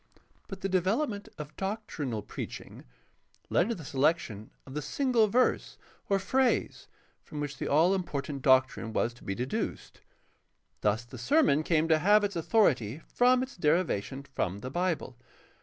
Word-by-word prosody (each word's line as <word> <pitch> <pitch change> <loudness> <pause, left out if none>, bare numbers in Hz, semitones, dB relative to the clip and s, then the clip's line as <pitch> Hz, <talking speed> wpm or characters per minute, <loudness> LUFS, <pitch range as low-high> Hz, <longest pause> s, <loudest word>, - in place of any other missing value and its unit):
But 195 -2 -8
the 195 - 0
development 200 - 0
of 150 0 -8
doctrinal 160 - -3
preaching - - -8 0.7
led 180 - +3
to 235 - -1
the 165 - -10
selection 135 -7 0 0.2
of 135 - -11
the 150 - -3
single 235 - +2
verse 245 +5 +1 0.3
or 195 - +3
phrase 250 +7 0 0.3
from 150 - -8
which 145 -2 -4
the - - -3
all 165 +6 +4
important 145 -6 -3
doctrine 130 -4 +3
was 120 - 0
to 125 - -18
be 100 - -3
deduced. 125 +4 -4 0.8
Thus 110 +3 +1
the 120 0 -11
sermon 270 - +3
came 160 0 +1
to 160 -1 +4
have 205 +5 +5
its 200 -2 -1
authority 155 - +1
from 250 +1 +4
its 260 - -8
derivation 150 - 0
from 100 -8 -3
the 130 - -6
Bible. 170 -7 -2
155 Hz, 155 wpm, -29 LUFS, 130-200 Hz, 0.8 s, have